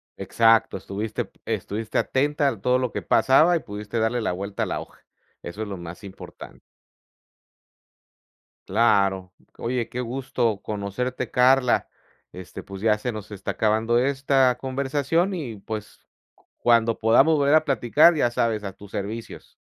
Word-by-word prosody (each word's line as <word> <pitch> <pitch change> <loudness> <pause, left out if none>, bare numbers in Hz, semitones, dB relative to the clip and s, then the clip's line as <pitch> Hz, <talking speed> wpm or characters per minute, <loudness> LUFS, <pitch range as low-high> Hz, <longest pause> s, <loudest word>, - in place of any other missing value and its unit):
Exacto, 115 -3 +2
estuviste 105 +3 -4
p - - -29
estuviste 110 +2 -3
atenta 145 +2 +1
al 115 -8 -2
todo 125 +2 +2
lo 125 -2 -2
que - - -4
pasaba 155 +7 +4
y - - +1
pudiste 105 -1 -5
darle 110 +2 0
la 110 - -1
vuelta 100 +3 -4
a - - 0
la - - -3
hoja. - - -12 0.4
Eso 95 +6 -7
es 110 - -3
lo 100 -1 -6
más 85 +3 -9
importante. 100 -1 -11 2.1
Claro. 100 -3 +2 0.3
Oye, 120 0 -2
qué 125 - -5
gusto 120 -3 -2
conocerte, 110 +5 -4
Carla. 125 0 +3 0.5
Este, 90 0 -9
pues, 95 -1 -9
ya 110 -1 +3
se 120 +3 -4
nos 105 -1 -8
está 100 -2 -4
acabando 110 +2 +1
esta 135 -1 +2
conversación 140 +7 -1
y, 140 -11 -5
pues, 105 +1 -8 0.5
cuando 115 -1 +2
podamos 135 +8 +4
volver 140 +1 +3
a 155 - +5
platicar, 145 +3 +4
ya 135 -5 +2
sabes, 115 -3 -1
a 95 - -5
tus 100 -1 -15
servicios. 110 +3 -6
115 Hz, 150 wpm, -24 LUFS, 105-130 Hz, 2.1 s, a